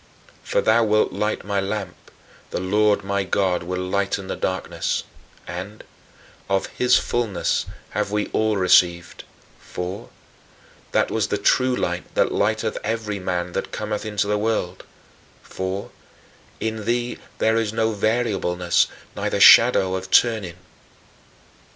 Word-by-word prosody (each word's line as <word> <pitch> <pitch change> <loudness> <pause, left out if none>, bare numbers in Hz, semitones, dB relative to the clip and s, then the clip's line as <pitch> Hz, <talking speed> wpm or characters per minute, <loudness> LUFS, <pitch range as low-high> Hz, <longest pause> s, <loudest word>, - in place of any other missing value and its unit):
"For - - 0
thou 115 +1 +4
wilt 110 0 +2
light 105 -1 -2
my 100 -1 0
lamp; 100 0 -4 0.5
the - - -3
Lord 105 +2 +2
my 100 0 -1
God 95 -1 0
will 90 +2 -4
lighten 100 0 -1
my - - -4
darkness"; 95 0 -2 0.4
and 95 +5 -7 0.7
"of 95 -1 +1
his 125 0 +2
fullness 115 -6 -1 0.2
have - - -1
we 105 0 0
all 110 -1 +1
received," 90 -2 +3 0.3
for 90 +3 -6 0.8
"that - - +1
was - - 0
the - - -1
true 130 0 +2
Light 90 -6 -3
that - - +2
lighteth 110 +1 0
every 110 -2 -2
man 90 -1 -2
that - - -4
cometh 105 -1 -3
into 105 -2 -1
the 105 0 0
world"; 105 -4 -2 0.6
for 95 +1 -5 0.7
"in 110 -1 -3
thee 120 +1 -1 0.2
there 110 0 +2
is 110 -2 0
no 110 0 0
variableness, 100 -6 +1 0.3
neither - - -2
shadow 95 -1 +7
of 95 0 -4
turning." 110 -8 +3
100 Hz, 130 wpm, -22 LUFS, 95-110 Hz, 0.8 s, shadow